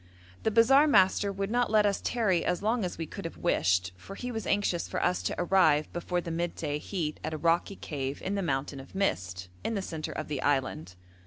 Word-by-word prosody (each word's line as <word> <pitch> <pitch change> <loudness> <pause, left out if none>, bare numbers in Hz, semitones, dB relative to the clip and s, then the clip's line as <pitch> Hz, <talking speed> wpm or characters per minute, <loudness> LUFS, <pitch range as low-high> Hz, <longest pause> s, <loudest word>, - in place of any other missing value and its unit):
The - - +1
bazaar 265 +7 +6
master 200 -4 +4
would 195 +1 -3
not 245 0 +2
let 215 -1 +4
us 200 -1 +1
tarry 195 -8 +1
as 180 - -1
long 225 +1 +1
as 180 - -3
we 165 - -3
could - - -8
have - - -6
wished, 90 +1 +1
for 195 - -10
he 250 +3 -5
was 225 -2 -4
anxious 200 -4 +1
for - - -3
us 180 0 +1
to - - -2
arrive 175 -5 +3
before 175 +1 -2
the 170 - -5
midday 165 -3 -2
heat 155 -3 -3
at 155 0 -3
a - - -3
rocky 170 +5 +1
cave 140 -5 -4
in 190 - -2
the 200 - 0
'mountain 135 -4 -2
of 135 +7 -12
mist,' 90 - -1 0.2
in 225 - -1
the 200 - -1
centre 160 -4 -5
of 155 - -4
the 145 -3 -3
island. 130 - -1
175 Hz, 225 wpm, -29 LUFS, 145-200 Hz, 0.2 s, bazaar